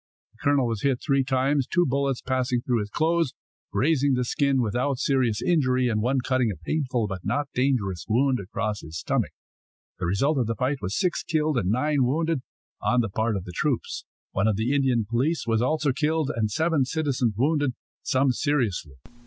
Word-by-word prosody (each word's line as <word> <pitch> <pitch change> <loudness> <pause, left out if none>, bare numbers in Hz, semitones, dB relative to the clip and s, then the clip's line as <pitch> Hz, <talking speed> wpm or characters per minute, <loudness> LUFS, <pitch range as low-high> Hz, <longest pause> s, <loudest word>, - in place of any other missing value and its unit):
The 110 - -29
colonel 140 -2 +3
was 115 -3 -2
hit 135 -3 +1
three 140 -2 +1
times, 135 +1 +1
two 175 0 +2
bullets 135 -1 0
passing 130 -1 0
through 120 -1 0
his 105 -1 -3
clothes, 165 +1 +1 0.4
grazing 140 -2 +2
the 125 - 0
skin, 140 +1 +1
without 125 +4 0
serious 125 -5 +1
injury, 130 -7 +2
and 110 -2 0
one 130 +3 +1
cutting 130 -3 +2
a 100 - -3
painful 130 - -1
but 95 -3 -5
not 145 0 -1
dangerous 120 -9 0
wound 130 +3 +2
across 105 +2 -3
his 80 +1 -8
stomach. - - 0 0.7
The 90 - -1
result 135 - +1
of 120 - 0
the 115 - -1
fight 130 +5 -1
was 95 +4 -2
six 180 -2 +1
killed 155 -4 0
and 95 -4 -1
nine 140 +5 +2
wounded 155 +3 0 0.4
on 125 0 +2
the 110 - -2
part 110 +3 0
of 95 - -3
the 90 - -9
troops. 140 - -1 0.3
One 100 +3 +1
of 110 - +2
the 110 +6 0
Indian 130 -5 +2
police 130 +7 0
was 115 -1 +1
also 150 +2 +1
killed, 155 +1 0
and 110 -2 0
seven 160 +5 +1
citizens 130 -6 0
wounded, 145 0 +1 0.3
some 130 0 +2
seriously. 115 - -1
130 Hz, 190 wpm, -25 LUFS, 115-145 Hz, 0.7 s, colonel